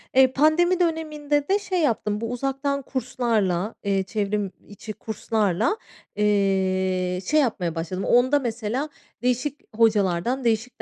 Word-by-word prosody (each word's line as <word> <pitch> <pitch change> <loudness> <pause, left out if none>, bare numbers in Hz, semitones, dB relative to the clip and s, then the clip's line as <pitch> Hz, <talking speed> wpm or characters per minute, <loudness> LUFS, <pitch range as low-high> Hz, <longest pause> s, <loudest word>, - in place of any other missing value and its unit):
Eee, 260 -1 +6
pandemi 345 +5 +3
döneminde 300 -4 0
de 400 +1 +3
şey 380 -3 -2
yaptım, 215 -6 0
bu 230 +1 -3
uzaktan 275 +2 -1
kurslarla, 225 -7 -1
eee, 195 -1 +1
çevrim 205 0 -2 0.2
içi 210 +1 -8
kurslarla, 215 - -1 0.4
eee, 190 -3 +1
şey 305 - +3
yapmaya 180 - -1
başladım. 180 +4 -3
Onda, 255 +4 +4
mesela, 240 +3 -2 0.3
değişik 250 +4 -1 0.2
hocalardan 220 +2 +2
değişik 230 +2 -1
230 Hz, 120 wpm, -24 LUFS, 200-280 Hz, 0.4 s, Eee